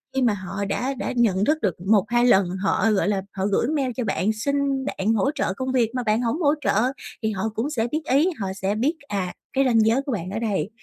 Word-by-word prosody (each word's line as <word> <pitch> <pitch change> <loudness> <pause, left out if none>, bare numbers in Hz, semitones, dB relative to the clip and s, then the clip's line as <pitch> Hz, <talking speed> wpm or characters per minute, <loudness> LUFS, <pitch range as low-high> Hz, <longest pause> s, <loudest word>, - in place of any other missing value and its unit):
khi 265 - +1
mà 240 -4 +3
họ 195 +1 -4
đã 255 +6 -1
đã 260 - -4
nhận 205 -5 +2
thức 305 +5 +2
được 190 -6 0
1-2 220 +4 +3
lần, 195 -7 +4
họ, 205 +2 +2
gọi 205 -1 +1
là, 200 -2 +1
họ 190 -1 -2
gửi 205 +2 +1
email 280 -3 0
cho 250 - 0
bạn 210 +1 0
xin 275 +3 -1
bạn 220 -5 0
hỗ 225 +5 +2
trợ 185 - -1
công 260 +6 -3
việc 240 -4 +2
mà 250 - -1
bạn 215 +1 +1
hổng 245 +8 -1
hỗ 290 -2 +4
trợ - - +1 0.5
thì 220 - +1
họ 210 +2 -2
cũng 240 +6 -1
sẽ 235 -6 -1
biết 310 - -1
ý, 290 +7 +4
họ 195 - -2
sẽ 195 +1 -2
biết, 270 +10 +1
à, 190 -3 -2 0.2
cái 270 0 +2
ranh 235 -3 +4
giới 230 +5 +3
của 275 - -5
bạn 185 -6 -3
ở 215 - -3
đây, 210 -3 -1
225 Hz, 255 wpm, -23 LUFS, 200-265 Hz, 0.5 s, lần